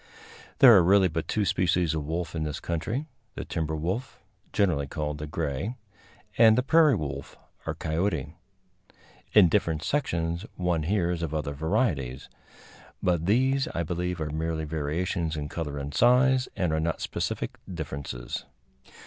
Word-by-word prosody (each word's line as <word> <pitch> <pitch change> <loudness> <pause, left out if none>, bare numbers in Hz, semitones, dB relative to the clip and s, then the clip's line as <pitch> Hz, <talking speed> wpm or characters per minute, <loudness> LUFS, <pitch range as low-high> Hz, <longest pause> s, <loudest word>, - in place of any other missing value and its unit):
There 120 -4 +9
are 95 - +7
really 95 +1 +5
but 80 0 -3
two 105 -2 0
species 90 -2 +1
of 80 -2 -3
wolf 85 +1 -3
in 80 - -3
this 75 0 -3
country 95 - -3 0.3
the - - -5
timber 80 -2 -2
wolf, 95 - -3 0.3
generally 80 -9 +1
called 75 +1 -4
the 75 - -5
gray, 75 - -3 0.6
and 110 -1 +7
the 125 - +2
prairie 155 -1 +5
wolf 70 -6 -5 0.3
or - - -2
coyote. 80 -3 -1 1.0
In 105 -4 +8
different 80 -1 0
sections 85 - -1
one 90 -3 0
hears 90 0 0
of 80 -2 -3
other 75 -2 -2
varieties; 75 - -1 0.7
but 85 -2 +1
these, 130 +5 +2
I 85 - 0
believe, 90 +1 -3
are 75 -1 -3
merely 80 0 -2
variations 80 +2 -2
in 75 -1 -4
color 75 -3 -4
and 70 0 -5
size, 125 - +4
and 90 -5 0
are 80 - +1
not 80 +1 -1
specific - - -3
differences. 70 -7 -5
85 Hz, 150 wpm, -27 LUFS, 75-100 Hz, 1.0 s, There